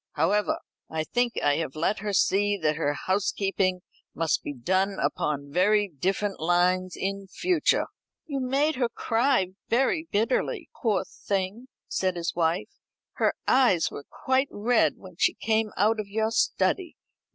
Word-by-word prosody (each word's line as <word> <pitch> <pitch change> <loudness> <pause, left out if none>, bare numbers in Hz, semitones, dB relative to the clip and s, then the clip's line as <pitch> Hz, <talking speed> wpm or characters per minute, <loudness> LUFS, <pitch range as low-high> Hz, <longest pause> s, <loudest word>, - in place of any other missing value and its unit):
However, 185 +4 +1 0.3
I 160 0 -2
think 245 +7 0
I 145 - +3
have 160 -4 -3
let 170 +7 0
her 205 +1 -3
see 200 +1 +2
that 155 -4 +1
her 145 -2 0
housekeeping 190 -1 0 0.3
must 165 -1 +1
be - - -5
done 185 +9 0
upon 140 -1 -1
very 205 +5 +3
different 190 +6 -2
lines 180 +2 +2
in 195 0 -3
future." 345 - +1 0.4
"You 280 -4 -3
made 275 +3 +1
her 245 -2 +1
cry 235 -5 +1 0.2
very 270 +7 +1
bitterly, 260 - 0
poor 215 -6 +2
thing," 200 +5 -3 0.2
said 185 -1 -1
his 170 -1 -2
wife. 175 +5 -1 0.4
"Her - - +2
eyes 190 - +4
were 140 - -8
quite 265 +1 0
red 230 +3 +2
when 185 -3 -13
she - - +3
came 220 -1 0
out 215 +3 +3
of 210 - -3
your 220 +2 -1
study." 345 +8 +1
200 Hz, 150 wpm, -26 LUFS, 175-230 Hz, 0.4 s, eyes